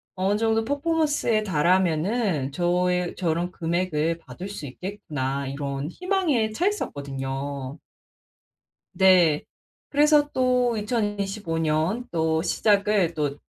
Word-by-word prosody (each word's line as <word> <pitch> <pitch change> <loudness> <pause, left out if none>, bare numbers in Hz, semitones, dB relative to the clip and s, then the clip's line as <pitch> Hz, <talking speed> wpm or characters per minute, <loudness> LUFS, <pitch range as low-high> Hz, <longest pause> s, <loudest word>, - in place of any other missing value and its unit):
어느 195 +3 +1
정도 225 0 +1
퍼포먼스에 290 -6 +1
달하면은 175 - +1
저에 180 +2 0
저런 175 0 -1
금액을 165 -2 -1
받을 185 +3 -9
수 200 -7 -7
있겠구나." 140 -5 -4
이런 140 +1 -4
희망에 335 - 0
차있었거든요. 140 - -3 1.2
네. 180 -5 +5 0.5
그래서 295 0 +4
또 250 -2 +2
2025 205 -5 -2
년 165 +9 0
또 160 -1 +1
시작을 200 -4 +2
또 145 -2 -2
180 Hz, 220 characters per minute, -25 LUFS, 155-220 Hz, 1.2 s, 네